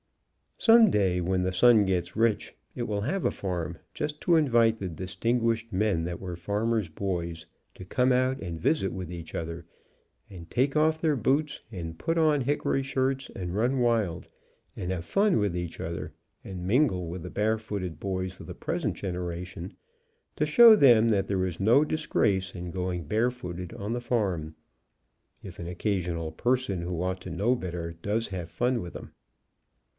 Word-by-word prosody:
Some 225 -1 +7
day, 95 -3 +2
when 90 +1 0
The 95 0 -1
Sun 110 +2 +6
gets 95 -2 -1
rich, 110 -1 +1 0.2
it 120 - -3
will 105 -3 -2
have 185 - -1
a - - +3
farm, 90 -4 -4 0.2
just 150 0 -3
to 170 - +3
invite 120 -7 +4
the 95 -4 -4
distinguished 115 +6 -1
men 95 -4 +1
that 85 0 -4
were 90 -2 -5
farmers' 105 +2 -1
boys, 85 -2 -3 0.3
to 95 - -10
come 125 +7 +2
out 130 +1 +2
and 85 -6 -5
visit 95 - +1
with 90 -2 -6
each 85 -2 -8
other, 85 +1 -5 0.6
and 85 -4 -11
take 135 +4 +1
off 155 +1 +2
their 155 -3 +2
boots 140 +5 0
and 85 -5 -6
put 165 +1 -1
on 155 -3 +3
hickory 135 0 0
shirts, 135 0 -1
and 90 -1 -4
run 125 +5 +1
wild, 115 -8 +1 0.5
and 90 - -4
have 90 -2 -3
fun 200 - +2
\vith 100 -4 0
each 85 -1 -5
other, 80 -2 -5 0.3
and 90 -2 -7
min 130 +9 +4
gle 90 -6 -4
with 85 +2 -6
the 90 - -7
barefooted 105 -6 -2
boys 95 -1 -3
of - - -9
the - - -7
present - - -2
generation, 90 0 -5 0.6
to 150 - 0
show 225 +9 +9
them 120 - +6
that 100 -3 +1
there 95 -2 0
is 90 -3 -4
no 115 +9 +5
disgrace 100 -11 0
in 90 -1 -6
going 90 -1 -3
bare 110 +10 +1
footed 90 -7 -7
on 105 +3 -4
the 120 - -2
farm, 95 -10 -1 0.9
if 90 -3 -10
an 85 - -5
occasional 90 -3 -2
person 120 -1 0
who 85 -1 -3
ought 95 0 -2
to - - -7
know 100 +8 +1
r - - +4
better 85 -6 -5
does 110 +4 -1
have 90 -3 -5
fun 120 +3 0
with 85 - -7
them. - - -9
100 Hz, 180 wpm, -28 LUFS, 90-120 Hz, 0.9 s, show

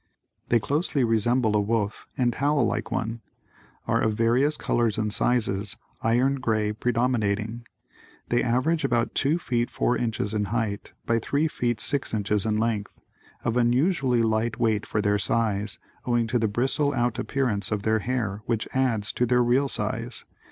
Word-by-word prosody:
They 120 - +5
closely 145 - 0
resemble 115 0 +2
a 105 - +3
wolf 105 0 -2
and 120 -2 +2
howl 140 -1 +2
like 110 0 -2
one. 115 +1 -2 0.7
Are - - +2
of 110 - +1
various 120 +7 +2
colors 115 -3 0
and 105 -1 0
sizes, 105 -6 0 0.2
iron 125 +4 +2
grey 110 -4 0
predominating. 115 -1 -1 0.6
They 120 - +2
average 130 +7 +1
about 120 -1 +1
two 150 +5 +2
feet 120 -7 -1
four 125 - 0
inches 110 -3 -2
in 105 -1 0
height 105 -1 -3
by 115 0 +2
three 145 +7 0
feet 120 -6 -1
six 130 +2 0
inches 105 0 0
in 105 -1 +1
length, 110 -2 -2 0.4
of 115 - 0
unusually 125 0 +2
light 110 +2 0
weight 110 -3 +1
for 105 - -1
their 105 -1 +2
size, 105 +1 0 0.3
owing 120 -1 +2
to 120 +2 0
the 110 - +1
bristle 135 +6 0
out 120 -2 0
appearance 110 -8 0
of 105 -2 -1
their 110 0 +2
hair 110 -3 -2
which 115 -2 -1
adds 120 -6 +1
to 125 - +1
their 125 0 +3
real 125 +4 +2
size. 115 0 -3
115 Hz, 165 wpm, -25 LUFS, 110-125 Hz, 0.7 s, They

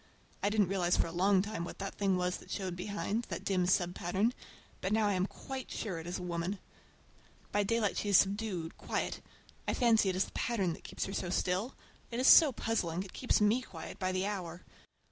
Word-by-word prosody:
I 205 - +2
didn't 205 -3 +2
realize 180 -2 +2
for - - +2
a 165 - -5
long 190 +2 +3
time 210 -4 -4
what 170 - -7
the 195 - -4
thing 195 -2 +1
was 180 0 0
that - - -15
showed 185 -3 -3
behind,—that 205 +4 -3
dim 185 -2 +1
sub 180 -2 +2
pattern,—but 190 +1 -3
now 215 0 +3
I 205 - +2
am 185 +1 +1
quite 265 +3 -7
sure 190 -7 -4
it 165 - -8
is 175 - -3
a 180 - -6
woman. 175 +3 -2 0.9
By 205 - +2
daylight 210 -1 +1
she 205 - -1
is 200 - +7
subdued, 195 -4 0
quiet. - - -2 0.5
I - - +1
fancy 225 -5 +4
it 185 - -1
is 185 - +2
the - - -13
pattern 200 -8 0
that - - -12
keeps - - -4
her 195 - -5
so 180 - -2
still. 185 +7 0 0.3
It 235 - -3
is 255 - +1
so 310 0 +9
puzzling. 185 -7 -1
It 195 - -12
keeps 255 - +1
me 210 +4 +4
quiet 165 -10 -9
by 185 -1 0
the 185 +1 0
hour. 180 -4 -4
195 Hz, 215 wpm, -32 LUFS, 180-215 Hz, 0.9 s, so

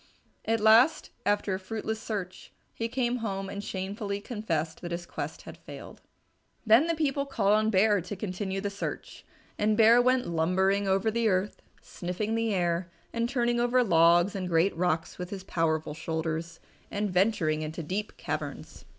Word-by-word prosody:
At 225 0 +1
last, 225 +8 +5 0.2
after 205 -1 +1
a 185 - -2
fruitless 220 +2 -4
search, 200 -6 -5 0.2
he 230 - -2
came 245 0 -1
home 195 -4 -4
and 200 0 -5
shamefully 200 +1 -4
confessed 170 -8 -3
that 175 - -5
his 170 0 -4
quest - - -6
had - - -11
failed. - - -11 0.6
Then 230 +8 +6
the 335 - +1
people 280 -3 0
called 210 -7 +2
on 215 +1 +3
Bear 205 -1 +3
to 180 +4 -6
continue 190 0 -3
the 200 0 -2
search. 200 - -6 0.4
And 210 0 +2
Bear 230 +2 +7
went 255 0 +2
lumbering 190 +4 +1
over 195 +3 +2
the 230 0 +1
earth, 190 0 0 0.2
sniffing 185 +5 -4
the 225 0 0
air, 175 -2 0 0.2
and 235 0 0
turning 240 -2 +1
over 245 +1 +3
logs 170 -1 +4
and 185 -2 -3
great 170 +3 +2
rocks 170 -1 -1
with 180 0 -5
his 195 -1 -6
powerful 160 -4 -1
shoulders, 160 +1 -4 0.3
and 205 -1 -2
venturing 180 -5 +2
into 155 +2 -5
deep 195 +7 -4
caverns. - - -5
200 Hz, 170 wpm, -28 LUFS, 175-225 Hz, 0.6 s, Bear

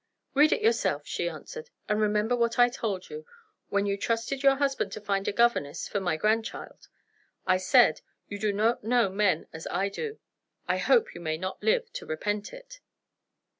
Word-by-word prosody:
"Read 295 +2 +5
it - - +1
yourself," 450 - +1
she - - -2
answered; 470 0 -9 0.2
"and 210 +1 +1
remember 210 +3 +1
what 235 0 0
I 245 0 +6
told 205 -6 -4
you, 455 +1 -7 0.5
when 200 0 +1
you 200 -1 0
trusted 230 +6 -2
your 275 -1 +5
husband 275 -1 -1
to - - -5
find 200 -1 -2
a - - +2
governess 235 -11 +1
for 205 - -2
my 175 -4 -1
grandchild. 220 +5 -2 0.6
I 185 - +3
said: 185 -4 +4 0.3
'You 205 - -6
do 210 0 +1
not 220 +4 +1
know 235 -2 +2
men 190 -4 +1
as 160 0 -7
I 195 +3 0
do.' 435 - -5 0.5
I - - +1
hope 470 -1 +3
you - - -9
may 155 -1 -2
not 185 +3 -5
live 470 +1 +1
to - - -7
repent 205 +6 -3
it." - - -12
215 Hz, 185 wpm, -28 LUFS, 195-270 Hz, 0.6 s, I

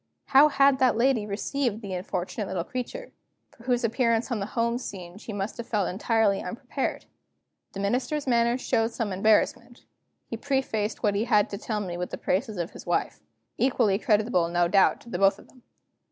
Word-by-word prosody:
How 280 +2 +7
had 275 -1 +4
that 255 -4 +3
lady 235 -3 +2
received 225 +2 -2
the 195 -2 -5
unfortunate 185 +2 -3
little 185 -3 -2
creature, 255 - -6 0.4
for 235 - -18
whose 245 -2 +1
appearance 230 +1 +1
on 235 - 0
the 195 - -3
home 235 +1 +1
scene 185 -5 -8
she 225 - -8
must 200 +1 -4
have 235 - -7
been 210 -4 +1
entirely 210 0 +1
unprepared? 250 +7 -4 0.7
The 195 - -5
Minister's 260 +8 -1
manner 235 -1 +2
showed 230 -3 0
some 215 -5 -2
embarrassment; 220 +4 +1 0.4
he 230 - -6
prefaced 230 -6 -2
what 205 -2 +3
he 205 +3 0
had 210 -3 +3
to 200 - -4
tell 215 -2 -3
me 175 -3 -4
with 180 0 -5
praises 210 +2 -1
of 170 0 -3
his - - -12
wife, - - -1 0.4
equally 235 -6 +2
creditable 210 -6 +2
no 175 0 +2
doubt 195 +2 +3
to 235 - -14
both 195 -1 +3
of - - -16
them. 255 - -21
225 Hz, 180 wpm, -26 LUFS, 200-245 Hz, 0.7 s, How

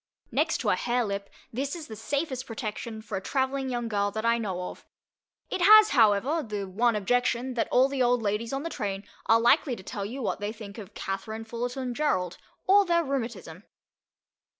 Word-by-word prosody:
Next - - +1
to - - 0
a - - +3
hare 245 0 0
lip, 200 -1 -4 0.2
this 275 +6 -2
is 330 -3 -7
the 220 - -8
safest 260 +3 -2
protection 220 -1 -5
for 215 -3 -4
a - - -4
travelling 265 +3 -1
young 240 -2 -2
girl 205 -2 0
that 220 +2 -4
I 235 0 +3
know 185 -5 -3
of; - - -14 0.7
it 370 - -2
has, 430 +3 +9
however, 240 +6 +3
the 210 -6 -4
one 225 +5 +2
objection 245 +4 +1
that 235 - 0
all 255 +2 +5
the 275 -1 -2
old 245 -1 +3
ladies 210 +3 -1
on 270 +1 -2
the 335 - -4
train 200 -6 -3 0.2
are 225 0 +6
likely 245 +2 +3
to 190 - -12
tell 200 +1 -5
you 245 +6 -5
what - - -1
they 205 +1 -2
think 215 -1 -9
of 205 -1 -11
Katherine 220 +3 -4
Fullerton 245 +2 -3
Gerould, 185 - 0 0.3
or 400 +2 +6
their 340 -2 +2
rheumatism. 230 - -4
235 Hz, 195 wpm, -27 LUFS, 205-265 Hz, 0.7 s, has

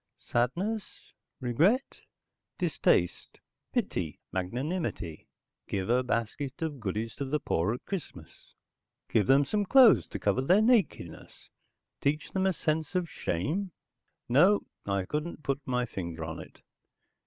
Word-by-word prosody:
Sadness? 185 - -2 0.3
Regret? 160 - +1 0.6
Distaste? - - +1 0.3
Pity? 95 - -2
Magnanimity? 110 - -3 0.4
Give 95 +2 -1
a 125 +1 +4
basket 130 +6 -2
of 150 -4 -3
goodies 110 +2 -3
to 140 - -2
the 150 +3 0
poor 95 - 0
at 125 - -12
Christmas? 135 - -8 0.6
Give 105 -4 +3
them 140 +1 +5
some 205 +8 0
clothes 240 +1 +6
to - - -5
cover 105 +5 +1
their 185 +10 +4
nakedness? 220 - 0 0.5
Teach 150 +2 0
them 190 0 +1
a 190 - +2
sense 160 +1 -1
of 175 -3 0
shame? 160 - -2 0.5
No, 175 +12 +5 0.2
I 100 -2 0
couldn't 150 - -4
put 140 0 -1
my 125 -1 +1
finger 85 -7 -5
on 80 0 -5
it. - - -12
140 Hz, 130 wpm, -29 LUFS, -, 0.6 s, clothes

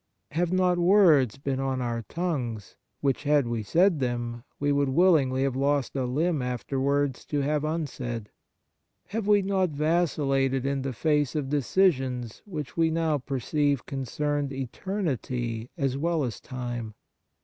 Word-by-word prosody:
Have 170 +3 0
not 180 -1 +2
words 170 - +5
been 135 -1 -2
on 135 -1 -1
our 120 -2 -2
tongues 125 - -3 0.3
which, 135 -2 +1
had 145 -2 +3
we 120 -1 -2
said 170 - +3
them, 120 -2 -2 0.2
we 145 0 +1
would 140 -1 +2
willingly 135 -4 +3
have 135 -2 0
lost 140 0 0
a 130 -2 0
limb 150 +4 0
afterwards 135 +2 -1
to 145 -1 -1
have 150 +1 0
unsaid? 130 -8 -3 0.8
Have 210 0 -3
we 205 -1 +5
not 190 -1 +1
vacillated 140 -4 +1
in 140 0 0
the 135 0 -2
face 150 +1 +1
of 145 -3 -1
decisions 135 - +1
which 155 -9 -6
we 165 -1 +3
now 160 -2 +1
perceive 140 +1 0
concerned 145 +1 -2
eternity 130 - -3
as 135 -3 -1
well 165 0 +1
as 120 -5 -3
time 120 -4 -5
140 Hz, 145 wpm, -27 LUFS, 130-160 Hz, 0.8 s, words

